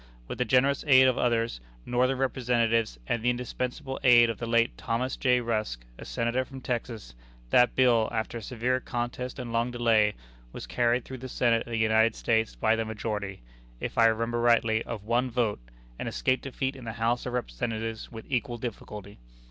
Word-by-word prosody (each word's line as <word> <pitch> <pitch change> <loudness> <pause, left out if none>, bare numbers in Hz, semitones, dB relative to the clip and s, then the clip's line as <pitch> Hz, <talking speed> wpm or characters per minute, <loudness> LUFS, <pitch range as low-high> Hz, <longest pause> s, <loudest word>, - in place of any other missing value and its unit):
With - - -6
the 125 - +2
generous 135 +3 +3
aid 130 -2 +7
of 130 - +3
others, 115 - 0 0.2
Northern 130 +2 +1
Representatives, 115 - +1
and 115 - -1
the 120 - +2
indispensable 125 +3 -3
aid 120 -2 +6
of 110 - -9
the 115 - -4
late 115 0 +2
Thomas 125 +3 -2
J. 125 -2 +2
Rusk, 110 - -2
a - - -8
Senator 120 +2 -1
from 135 +1 -10
Texas, 115 - -4 0.4
that 125 0 +4
bill, 120 -4 +4
after 115 0 -3
a - - -11
severe 125 +3 -1
contest 120 0 -4
and 120 -3 -6
long 115 +1 +1
delay, 115 -4 +2 0.4
was - - -7
carried 120 0 +1
through 130 -1 -8
the 130 +1 -7
Senate 120 -2 +1
of - - -9
the 115 - -1
United 110 0 +3
States 110 -1 0
by 110 0 +2
the 115 - -1
majority, 105 -3 -4 0.4
if - - -5
I 115 - +6
remember 115 +1 0
rightly, 115 -2 +3
of 105 - -6
one 120 +4 +1
vote, 115 -3 0 0.4
and - - -3
escaped 130 0 0
defeat 135 0 -3
in 130 -3 -10
the 115 - -4
House 115 +2 -1
of 125 - -4
Representatives 115 - -3
with 115 -1 -9
equal 125 -2 -2
difficulty. 105 -4 -7
120 Hz, 190 wpm, -28 LUFS, 115-125 Hz, 0.4 s, aid